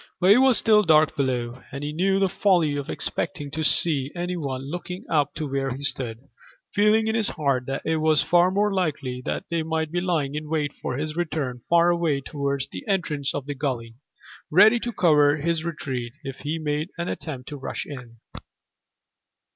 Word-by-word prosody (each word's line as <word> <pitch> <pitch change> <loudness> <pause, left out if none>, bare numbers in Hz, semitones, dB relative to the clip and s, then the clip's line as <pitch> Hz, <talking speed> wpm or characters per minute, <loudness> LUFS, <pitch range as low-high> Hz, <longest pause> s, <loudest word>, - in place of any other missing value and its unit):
But 185 +2 +5
it 220 - +7
was 260 -3 +5
still 215 -2 +5
dark 155 -4 +4
below, 125 -3 -2
and 140 +2 -6
he 150 +1 -3
knew 190 +4 +2
the 195 0 +3
folly 175 -7 +2
of 145 -1 -4
expecting 145 -7 -3
to 160 +2 -3
see 145 -3 +2
any 175 +1 -2
one 135 -5 -4
looking 175 +5 -6
up 145 -3 +1
to 155 - -3
where 135 0 -1
he 135 +2 -5
stood, 120 -5 -2 0.5
feeling 210 +2 +4
in 220 - 0
his 225 -2 +1
heart 140 -5 -1
that 135 - -3
it 160 0 +1
was 155 -1 +3
far 175 +1 +4
more 205 +2 +1
likely 140 -9 -2
that - - -2
they 170 -1 +1
might 160 -1 -2
be 175 +1 -1
lying 160 -6 0
in 150 0 -5
wait 150 -3 -1
for 125 - -3
his 155 +1 -3
return 150 -7 -2
far 170 0 +5
away 170 -5 +1
towards 140 -1 -3
the - - -8
entrance 160 -8 -1
of 145 - -3
the 145 - -3
gully, 130 -5 -3 0.6
ready 210 +8 +6
to 240 - -3
cover 150 -7 +4
his 160 +1 -1
retreat 130 -8 -4
if 135 -1 -6
he 150 +3 -3
made 150 +1 -2
an 170 0 -3
attempt 135 -5 -6
to 145 - -6
rush 135 - -5
in. 125 -5 -10
155 Hz, 195 wpm, -24 LUFS, 140-175 Hz, 0.6 s, it